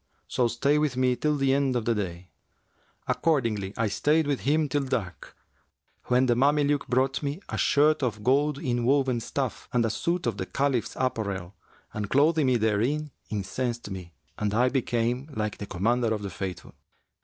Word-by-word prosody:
So 125 - +1
stay 140 +6 +1
with 150 -4 0
me 130 -1 +3
till 150 +3 0
the 135 -1 +2
end 135 -2 +1
of 120 -3 -1
the 115 - +2
day.' 90 -4 -5 0.8
Accordingly 115 -11 0
I 115 - +1
stayed 150 +9 +2
with 145 -2 0
him 150 +2 +1
till 145 +1 0
dark, 95 - -4 0.7
when 125 +1 +3
the 120 - +3
Mameluke 145 +2 +2
brought 130 +1 +1
me 145 +3 -3
a - - -3
shirt 150 +1 +3
of 115 -5 -2
gold 140 +4 +2
inwoven 130 -1 +1
stuff 130 +1 -4
and 120 -2 +2
a 110 - 0
suit 170 - -1
of 115 -4 -1
the 95 - -4
Caliph's 135 -4 0
apparel 100 -8 -2 0.4
and 105 -2 -4
clothing 150 +1 +3
me 125 -1 +3
therein, 120 +8 0 0.2
incensed 105 +2 -3
me[FN#358] 90 -2 -8 0.3
and 105 -1 -1
I 125 +2 +4
became 125 +1 -1
like 105 -1 -2
the 100 - -5
Commander 115 +6 +1
of 105 - -6
the 100 - -4
Faithful. 95 -1 -6
125 Hz, 175 wpm, -27 LUFS, 105-140 Hz, 0.8 s, I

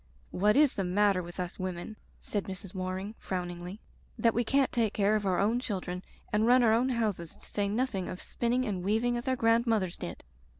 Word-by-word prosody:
"What 210 +3 +3
is 290 -1 +5
the 195 - -1
matter 195 +1 +3
with 175 +1 -9
us 180 0 -4
women," 185 +3 -4 0.2
said 205 -2 -3
Mrs. 190 0 -6
Waring 185 +2 -3
frowningly, 180 +1 -5 0.4
"that 230 0 +3
we 240 - +1
can't 270 +3 +2
take 225 -3 +1
care 205 +1 +3
of 210 -2 0
our 185 -2 +2
own 220 +5 +2
children 185 -6 -4 0.3
and 215 +2 +3
run 250 +1 +6
our 220 -2 +5
own 245 +3 +3
houses, 210 -9 -1
to - - -13
say 205 -1 -1
nothing 215 -4 -1
of 180 - -6
spinning 245 +2 -1
and 190 -5 -2
weaving 225 +5 +1
as 240 +2 -4
our 260 - +2
grandmothers 230 -5 +2
did 85 - -6
210 Hz, 205 wpm, -30 LUFS, 185-235 Hz, 0.4 s, run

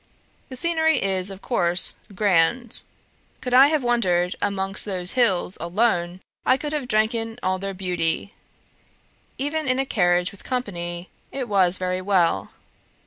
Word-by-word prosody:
The 260 - -7
scenery 320 +2 +1
is, 190 -1 0
of 195 0 -10
course, 175 -7 +2 0.2
grand; 205 +5 +2 0.6
could 250 - -4
I 265 +2 +8
have 300 -2 0
wandered 185 -8 +1
about - - +2
amongst 195 0 -1
those 185 -3 +1
hills 195 -7 +1
ALONE, 175 -1 0 0.2
I 255 - +3
could 295 +2 -5
have 290 -4 -2
drank 215 +1 +2
in 225 0 -4
all 185 0 0
their 195 0 -4
beauty; 180 0 -2 1.0
even 290 +2 -2
in 255 0 +2
a 270 - 0
carriage 180 -6 +1
with 200 - -13
company, 175 -8 -4 0.2
it 265 -3 -4
was 185 -3 +3
very 185 0 -2
well. 185 -3 +1
195 Hz, 150 wpm, -23 LUFS, 180-250 Hz, 1.0 s, I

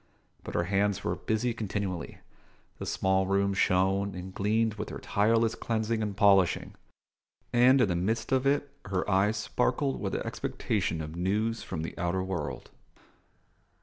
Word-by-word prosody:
But - - -7
her 85 - +2
hands 100 +2 0
were - - -1
busy 115 +2 -1
continually; 100 -5 -4 0.6
the - - -5
small 95 0 +1
room 100 0 +2
shone 95 +1 +2
and 90 +1 -7
gleamed 110 +3 +1
with 105 0 -5
her - - -6
tireless 115 +2 +2
cleansing 110 0 -1
and 105 -2 -3
polishing; 100 -4 +4 0.8
and 125 +3 +6
in 120 - +4
the 90 - 0
midst 110 +6 -1
of 130 0 +2
it 140 0 +1
her 95 -1 -2
eyes 100 +3 +2
sparkled 65 - 0
with - - -2
expectation 90 -6 -2
of 75 +1 -7
news 105 +6 0
from 80 - -5
the 80 - -6
outer 90 +2 0
world. 80 -8 -4
100 Hz, 150 wpm, -29 LUFS, 95-110 Hz, 0.8 s, and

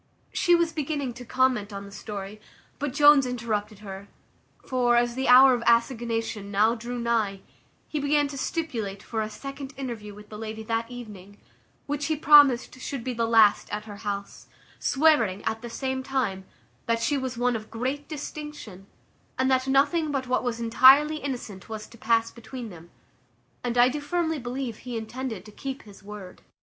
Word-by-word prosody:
She 350 - +4
was 340 -1 +1
beginning 290 -4 -2
to 245 +1 -10
comment 250 -4 +1
on 200 0 -6
the 200 - -12
story, 205 0 -7 0.4
but 290 -1 -2
Jones 290 -1 +6
interrupted 220 -4 -3
her; 195 0 -8 0.6
for, 245 -2 +2
as 240 0 +2
the 265 +2 -2
hour 255 +1 +8
of 245 - -1
assignation 230 -3 +1
now 210 +3 +3
drew 240 +1 -5
nigh, 225 -5 0 0.5
he 305 - -3
began 290 0 +2
to 280 - -7
stipulate 235 - -3
for 220 -1 -3
a 215 - -3
second 275 +5 -8
interview 225 -6 -6
with 210 0 -14
the 210 - -9
lady 220 0 -6
that 230 +1 -2
evening, 205 -5 -10 0.5
which 290 0 -2
he 315 - +1
promised 285 -4 +5
should 270 -2 -4
be 255 - -3
the 230 -1 0
last 220 -3 +5
at 210 +1 -4
her 205 -2 -9
house; 200 -1 -5 0.3
swearing, 255 -10 +3
at 220 0 -2
the 240 - -7
same 260 +2 -3
time, 250 -8 -2 0.4
that 230 0 +1
she 285 - +1
was 260 -3 -3
one 245 0 +1
of 215 -1 -6
great 260 +6 -3
distinction, 295 - -8 0.5
and 260 +1 +2
that 260 0 +2
nothing 290 +4 +2
but 270 -2 -1
what 255 0 0
was 240 -2 -2
intirely 265 +6 +6
innocent 240 -10 -6
was 215 -1 -6
to - - -16
pass 230 0 +1
between 235 0 -8
them; 170 -1 -13 0.7
and 245 0 -2
I 245 +1 +7
do 290 +3 -3
firmly 320 0 -1
believe 245 -2 -4
he 245 -2 -6
intended 225 -2 -5
to 210 - -12
keep 270 +5 -6
his 205 -2 -15
word. 200 -2 -10
240 Hz, 180 wpm, -26 LUFS, 215-270 Hz, 0.7 s, hour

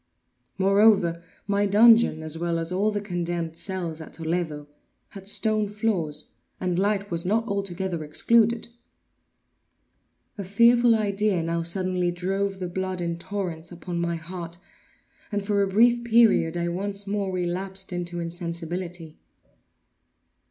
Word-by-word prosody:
Moreover, 195 -3 +4 0.2
my 200 0 +1
dungeon, 220 -5 +5
as 155 0 -3
well 170 0 -1
as 165 +1 -1
all 195 +4 +1
the 205 -1 -1
condemned 175 -4 -3
cells 170 -3 -4
at 160 - -11
Toledo, 160 -2 -3 0.4
had 195 -1 -10
stone 215 0 +1
floors, 190 -9 -2 0.3
and 180 -1 -1
light 200 0 0
was 170 0 -1
not 225 +5 0
altogether 190 -4 -3
excluded. 230 +9 +2 1.7
A - - -2
fearful 235 +4 +5
idea 205 -4 0
now 170 +1 -1
suddenly 180 +1 0
drove 195 +3 -2
the 185 -1 -4
blood 185 +1 -3
in 170 -1 -3
torrents 180 -4 -5
upon 175 0 -5
my 170 0 -1
heart, 170 +1 -7 0.7
and 205 -1 -2
for 200 -1 +1
a 200 - +2
brief 235 +5 +4
period, 225 -8 +4
I 170 0 -1
once 200 +3 -4
more 200 -1 -2
relapsed 185 +1 -2
into 175 0 -4
insensibility. 170 -1 -5
185 Hz, 130 wpm, -25 LUFS, 170-205 Hz, 1.7 s, dungeon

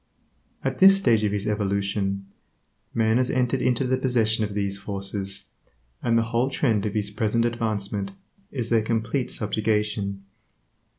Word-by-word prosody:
At - - -2
this 195 +1 +8
stage 115 - +3
of 105 - +1
his 100 0 -2
evolution, 100 -1 -1 0.7
man 110 0 +2
has 125 0 +2
entered 125 0 +1
into 125 +1 +2
the 130 +1 +1
possession 115 -4 +1
of 105 -1 -3
these 100 -1 -1
forces, 100 0 -4 0.5
and 115 -1 +2
the 115 - +3
whole 120 +3 0
trend 110 -6 +1
of 105 - -5
his 105 -1 -1
present 110 +2 +1
advancement 105 -4 -2 0.4
is 120 -4 -3
their 115 -1 +4
complete 115 +4 -1
subjugation. 105 -2 -1
110 Hz, 145 wpm, -25 LUFS, 100-120 Hz, 0.7 s, this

